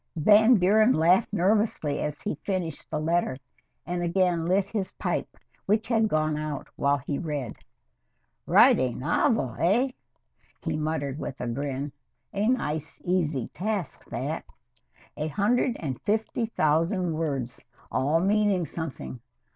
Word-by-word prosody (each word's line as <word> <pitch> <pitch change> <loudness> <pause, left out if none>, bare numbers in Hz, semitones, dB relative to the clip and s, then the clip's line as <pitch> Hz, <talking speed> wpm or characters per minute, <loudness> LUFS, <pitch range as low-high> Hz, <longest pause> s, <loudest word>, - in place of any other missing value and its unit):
Van 215 +9 +6
Buren 215 +5 +4
laughed 175 +7 +3
nervously, 200 -6 +1
as 150 -1 -4
he 210 - -1
finished 180 -6 -3
the 155 - -2
letter, 165 -3 0 0.5
and 175 0 -2
again 175 -1 +1
lit 190 +2 +3
his 200 -2 -3
pipe, - - -3 0.3
which 215 +3 +2
had 225 -2 +3
gone 155 -4 +1
out 150 -2 -4
while 140 +1 +2
he 140 +1 -4
read. 145 -8 -4 0.9
"Write - - +6
a 130 -2 0
novel, 130 - +1
eh?" 225 +10 +3 0.7
he - - -1
muttered 155 -2 -2
with 135 - -6
a 125 - -3
grin. 140 +3 -3 0.4
"A 205 +2 0
nice, 160 - -1
easy 160 -8 0
task 200 -2 -3
that. - - -4 0.7
A 155 - -2
hundred 225 - +1
and 135 -6 -4
fifty 220 +2 -1
thousand 165 0 +1
words, 140 -6 -3 0.3
all 145 +5 +2
meaning 200 -2 +2
something. 160 -6 -6
170 Hz, 135 wpm, -27 LUFS, 150-205 Hz, 0.9 s, Van